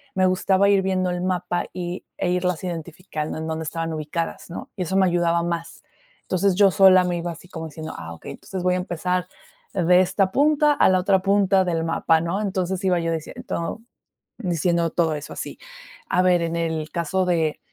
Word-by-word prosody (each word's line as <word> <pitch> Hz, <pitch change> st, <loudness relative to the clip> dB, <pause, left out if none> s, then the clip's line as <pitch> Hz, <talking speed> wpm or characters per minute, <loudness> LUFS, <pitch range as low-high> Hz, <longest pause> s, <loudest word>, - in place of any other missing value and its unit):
me 185 Hz, 0 st, +3 dB
gustaba 190 Hz, +1 st, +3 dB
ir 200 Hz, -1 st, +4 dB
viendo 185 Hz, -1 st, 0 dB
el 180 Hz, -, -3 dB
mapa 180 Hz, -1 st, -1 dB
y 180 Hz, 0 st, -5 dB
e 180 Hz, -, -1 dB
irlas 180 Hz, -1 st, 0 dB
identificando 165 Hz, -2 st, -5 dB
en 160 Hz, -, -4 dB
dónde 160 Hz, 0 st, -3 dB
estaban 165 Hz, +1 st, -3 dB
ubicadas, 160 Hz, +3 st, -4 dB
¿no? 170 Hz, -, -7 dB
Y 195 Hz, -, -5 dB
eso 185 Hz, +2 st, 0 dB
me 190 Hz, -, +5 dB
ayudaba 170 Hz, -1 st, +2 dB
más. 170 Hz, -1 st, -4 dB, 0.4 s
Entonces, 190 Hz, +1 st, +1 dB
yo 200 Hz, 0 st, +5 dB
sola 185 Hz, +1 st, +6 dB
me 175 Hz, -1 st, -1 dB
iba 170 Hz, 0 st, -3 dB
así 170 Hz, +2 st, -12 dB
como 160 Hz, -3 st, -6 dB
diciendo: 160 Hz, 0 st, -7 dB
"Ah, 85 Hz, 0 st, -7 dB
okey, 80 Hz, -, -9 dB
entonces, 185 Hz, -2 st, -7 dB
voy 180 Hz, 0 st, +2 dB
a -, -, +1 dB
empezar 180 Hz, 0 st, -2 dB, 0.5 s
de 180 Hz, -1 st, +4 dB
esta 190 Hz, +1 st, +2 dB
punta 295 Hz, +3 st, +4 dB
a -, -, +4 dB
la 185 Hz, -, +4 dB
otra 190 Hz, +1 st, +3 dB
punta 195 Hz, -1 st, +3 dB
del 165 Hz, -2 st, 0 dB
mapa", 165 Hz, 0 st, +2 dB
¿no? 170 Hz, +5 st, -1 dB
Entonces, 190 Hz, -2 st, -2 dB
iba 180 Hz, -2 st, +3 dB
yo 165 Hz, 0 st, -1 dB
dicien 160 Hz, -2 st, -5 dB
todo, 170 Hz, +6 st, -4 dB, 0.6 s
diciendo 170 Hz, -4 st, 0 dB
todo 160 Hz, -2 st, +1 dB
eso 150 Hz, 0 st, -8 dB
así. -, -, -6 dB, 0.5 s
A 180 Hz, -, +2 dB
ver, 180 Hz, -2 st, +3 dB
en 165 Hz, 0 st, -2 dB
el 160 Hz, -2 st, -2 dB
caso 175 Hz, +3 st, 0 dB
de 165 Hz, -4 st, +1 dB
180 Hz, 200 wpm, -23 LUFS, 165-185 Hz, 0.6 s, sola